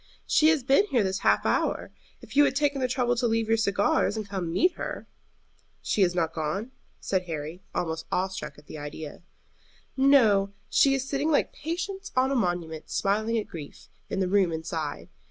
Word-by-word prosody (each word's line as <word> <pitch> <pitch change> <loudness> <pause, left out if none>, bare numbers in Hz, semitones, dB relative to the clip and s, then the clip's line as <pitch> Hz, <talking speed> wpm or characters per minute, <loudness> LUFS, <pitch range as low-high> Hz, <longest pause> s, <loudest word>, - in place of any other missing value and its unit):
"She 310 - +4
has 315 -4 +3
been 275 +10 +4
here 245 - +2
this 190 0 -1
half - - +2
hour, - - 0 0.3
if - - -12
you 290 - +7
had 270 - 0
taken 285 -1 +1
the 255 - +2
trouble 245 -1 +1
to 240 0 +1
leave 225 -1 0
your 225 - +3
cigars 205 0 +1
and 215 -2 -4
come 195 -3 -3
and 165 - -4
meet 360 - +3
her." - - -6 0.8
"She 210 - 0
has 180 -2 +3
not 165 -2 0
gone?" 170 +10 -3 0.3
said 185 -2 -1
Harry, 160 +1 -5
almost 160 -1 -2
awe 185 +1 +1
struck 190 0 -7
at 150 - -16
the 155 - -9
idea. 150 +1 -7 0.7
"No; 225 -8 +4 0.2
she 275 -1 +5
is 270 0 -3
sitting 285 +3 0
like 300 - +2
Patience 360 +5 -5
on 260 +1 +3
a - - +1
monument, 175 -7 -2
smiling 215 +3 0
at 215 - -1
grief, 150 -4 -10 0.2
in - - -2
the 190 - +1
room 190 -2 +3
inside. 160 -1 -4
205 Hz, 195 wpm, -27 LUFS, 175-265 Hz, 0.8 s, you